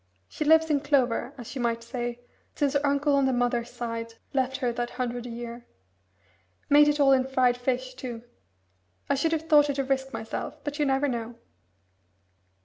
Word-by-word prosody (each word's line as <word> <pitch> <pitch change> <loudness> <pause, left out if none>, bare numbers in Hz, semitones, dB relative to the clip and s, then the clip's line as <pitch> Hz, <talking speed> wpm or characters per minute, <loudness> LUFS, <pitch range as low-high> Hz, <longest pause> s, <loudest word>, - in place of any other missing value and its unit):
She - - -4
lives 320 +1 +5
in 290 - +3
clover, 270 -2 +1
as 240 -3 -8
you 265 - -4
might 230 -1 -1
say, 240 0 -4 0.3
since 285 -1 +1
her 285 0 +1
uncle 285 +1 +2
on 275 -1 +3
the - - +2
mother's 245 -1 0
side 230 -2 -5 0.2
left 265 -1 0
her 245 -3 -1
that 240 0 -2
hundred 245 -1 -4
a - - -7
year. 235 0 -7 1.0
Made 295 +1 +7
it 295 0 +2
all 275 -1 +5
in 260 -1 +3
fried 255 -2 +3
fish, 255 +1 -2
too. 245 -3 -7 0.9
I - - +5
should 280 +4 +1
have 320 0 -2
thought 295 -2 +5
it 280 - -1
a 275 - +1
risk 265 0 -1
myself, 225 0 -5
but 290 +1 -5
you 295 - +3
never 270 +2 +2
know." 235 -2 -4
260 Hz, 190 wpm, -27 LUFS, 240-285 Hz, 1.0 s, Made